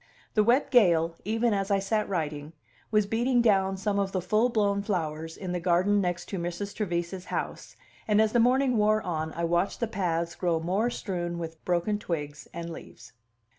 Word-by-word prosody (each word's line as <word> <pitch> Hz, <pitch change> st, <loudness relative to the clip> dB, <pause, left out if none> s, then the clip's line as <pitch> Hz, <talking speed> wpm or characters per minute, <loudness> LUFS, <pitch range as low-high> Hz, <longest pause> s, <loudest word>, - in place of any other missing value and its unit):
The 215 Hz, -, +4 dB
wet 255 Hz, +5 st, +3 dB
gale, 170 Hz, -, +4 dB
even 225 Hz, +2 st, +1 dB
as 195 Hz, 0 st, -1 dB
I 200 Hz, -, +3 dB
sat 210 Hz, +2 st, -1 dB
writing, 155 Hz, -4 st, -3 dB, 0.4 s
was 215 Hz, -1 st, +3 dB
beating 240 Hz, +4 st, +1 dB
down 195 Hz, -4 st, +3 dB
some 200 Hz, +1 st, 0 dB
of 195 Hz, -1 st, -1 dB
the 185 Hz, -, +1 dB
full 215 Hz, +7 st, +2 dB
blown 205 Hz, -4 st, +1 dB
flowers 160 Hz, -5 st, -3 dB
in 185 Hz, -3 st, -5 dB
the 180 Hz, -, -1 dB
garden 185 Hz, +4 st, +2 dB
next 180 Hz, -1 st, -2 dB
Mrs. 180 Hz, +2 st, -4 dB
Trevise's 180 Hz, -2 st, -3 dB
house, -, -, -5 dB, 0.3 s
and 210 Hz, -1 st, +3 dB
as 220 Hz, -1 st, +4 dB
the 240 Hz, -, +3 dB
morning 250 Hz, +1 st, +3 dB
wore 215 Hz, +1 st, +3 dB
on 160 Hz, -3 st, -2 dB
I 170 Hz, -, -3 dB
watched 175 Hz, +3 st, 0 dB
the 235 Hz, -, +1 dB
paths 170 Hz, -5 st, -1 dB
grow 170 Hz, -3 st, 0 dB
more 190 Hz, +8 st, 0 dB
strewn 175 Hz, -7 st, -3 dB
with 165 Hz, -1 st, -7 dB
broken 180 Hz, +4 st, 0 dB
twigs 150 Hz, -6 st, -5 dB
and 170 Hz, 0 st, -6 dB
leaves. -, -, -11 dB
190 Hz, 185 wpm, -28 LUFS, 170-215 Hz, 0.4 s, The